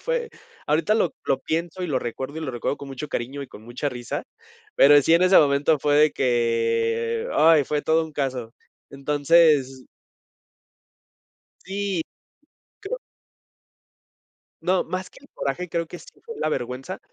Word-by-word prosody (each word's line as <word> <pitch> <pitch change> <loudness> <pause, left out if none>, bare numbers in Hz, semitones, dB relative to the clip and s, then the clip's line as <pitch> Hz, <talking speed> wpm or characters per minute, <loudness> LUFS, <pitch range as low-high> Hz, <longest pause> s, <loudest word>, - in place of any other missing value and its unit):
fue - - -2 0.4
ahorita 160 +8 +2
lo 200 -7 +1
lo 135 - +1
pienso 170 +3 -3
y - - -1
lo 140 -6 0
recuerdo, 130 +5 -5
y 160 - -4
lo 150 - -3
recuerdo 120 +3 -2
con 140 - -10
mucho 135 +3 -6
cariño 135 +3 -4
y - - -8
con 110 - -14
mucha 120 +5 -3
risa, 120 -3 -5 0.5
pero 145 +1 +7
sí, 165 +4 +3
en 170 - +4
ese 185 +1 +6
momento 145 +1 +3
fue 145 +1 +1
de 150 +1 +5
que 115 -2 0
¡ay! 155 -1 +5
Fue 150 +2 -1
todo 160 0 +2
un 155 - -11
caso. 130 -5 -3 0.4
Entonces 145 -1 +2 1.8
sí, 195 -2 -2 0.8
creo - - -5 1.6
No, 185 +1 +1
más 185 0 -4
que - - -17
el 280 - -18
coraje 170 +6 -3
creo 170 -1 -1
que - - -9
sí - - -15 0.2
fue 460 0 -8
la 155 - -1
vergüenza, 130 +7 -4
145 Hz, 160 wpm, -24 LUFS, 130-170 Hz, 1.8 s, pero